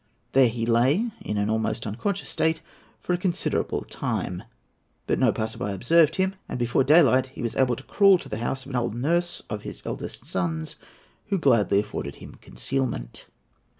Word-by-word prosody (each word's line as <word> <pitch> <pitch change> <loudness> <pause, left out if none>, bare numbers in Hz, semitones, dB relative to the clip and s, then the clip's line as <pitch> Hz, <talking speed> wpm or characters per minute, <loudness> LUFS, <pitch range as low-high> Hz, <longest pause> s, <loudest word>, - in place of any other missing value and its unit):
There 135 -1 +6
he 115 0 -2
lay, 130 - +2
in 105 - -3
an 105 0 +1
almost 110 +1 -1
unconscious 180 - -3
state, 160 0 0 0.4
for 180 - -2
a 175 - 0
considerable 180 -2 -1
time. - - -3 0.6
But - - 0
no - - +4
passer 110 0 -3
by 100 0 -2
observed 155 - +4
him; 190 0 +1 0.2
and - - -3
before 120 +2 +2
daylight 130 -3 +5
he 130 - -8
was 115 - -2
able 125 -2 +2
to 135 - -10
crawl 195 +2 +5
to - - -10
the 110 - -4
house 130 +3 -3
of 140 - -9
an - - -4
old 120 -2 -1
nurse 170 +8 0
of 105 -2 -4
his - - -8
eldest - - -6
son's, 80 -3 -2 0.5
who 200 -2 +1
gladly 115 - +3
afforded 70 -8 -6
him - - -12
concealment. 115 - -4
130 Hz, 185 wpm, -25 LUFS, 110-165 Hz, 0.6 s, There